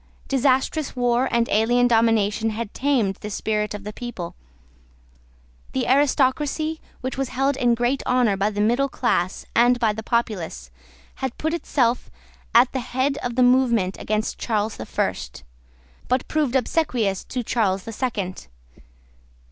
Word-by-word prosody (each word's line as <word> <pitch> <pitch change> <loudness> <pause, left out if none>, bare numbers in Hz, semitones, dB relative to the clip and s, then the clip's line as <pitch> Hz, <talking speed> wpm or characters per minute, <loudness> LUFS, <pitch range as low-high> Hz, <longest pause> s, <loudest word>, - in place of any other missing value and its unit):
Disastrous 270 +2 +1
war 245 +1 +2
and 235 0 +1
alien 240 +3 +3
domination 225 -2 +2
had 220 -1 -5
tamed 250 -9 +1
the 210 - -7
spirit 210 0 -1
of 205 - -8
the 210 +1 -6
people. 205 -9 -6 1.4
The 130 - 0
aristocracy, 290 +3 +1 0.2
which 260 +1 -4
was 270 -2 -1
held 270 +2 +1
in 245 -2 +2
great 245 +3 0
honour 245 -5 +3
by 195 +2 +1
the 205 -1 -2
middle 240 +6 +2
class 185 -9 -1
and 245 +1 +4
by 225 -3 +2
the 220 - -5
populace, 195 - -2 0.5
had 265 -2 -4
put 315 +1 -1
itself 255 -7 0 0.5
at 245 +2 +6
the 265 - -2
head 260 +3 -1
of 245 -1 -4
the 255 - +4
movement 240 -7 +3
against 215 +1 -2
Charles 215 -2 -1
the - - -7
First, - - -3 0.6
but 255 +1 0
proved 295 -5 0
obsequious 245 - 0
to 250 -2 -4
Charles 195 -5 0
the 225 - -7
Second. 205 - -3
240 Hz, 150 wpm, -23 LUFS, 210-260 Hz, 1.4 s, at